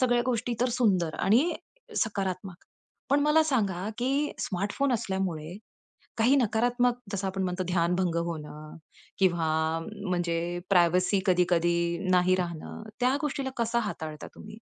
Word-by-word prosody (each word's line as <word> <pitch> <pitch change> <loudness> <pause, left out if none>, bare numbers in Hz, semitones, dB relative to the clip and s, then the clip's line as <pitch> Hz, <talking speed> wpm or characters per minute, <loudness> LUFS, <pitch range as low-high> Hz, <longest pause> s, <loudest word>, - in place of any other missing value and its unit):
सगळ्या 245 -2 +3
गोष्टी 240 -1 0
तर 250 - +3
सुंदर 185 -9 +2
आणि 260 - +3 0.5
सकारात्मक. 190 -3 -4 0.6
पण 285 +1 +4
मला 300 +2 +4
सांगा, 205 - 0
की 275 +4 0
स्मार्टफोन 205 +8 -1
असल्यामुळे, 190 -6 -2 0.6
काही 245 +5 +4
नकारात्मक 245 +1 +2
जसं 195 0 -2
आपण 190 0 -2
म्हणतो 180 0 -1
ध्यानभंग 175 0 +1
होणं 155 -2 -7 0.4
किंवा 175 -4 +2 0.6
म्हणजे 175 -2 0 0.3
प्रायव्हसी 180 +2 +4
कधी-कधी 170 0 +2
नाही 180 0 +4
राहणं, 170 +1 -5 0.2
त्या 255 +2 +3
गोष्टीला 275 -2 -2
कसं 235 0 +1
हाताळता 155 -5 -6
तुम्ही? 210 0 -11
190 Hz, 125 wpm, -28 LUFS, 175-245 Hz, 0.6 s, पण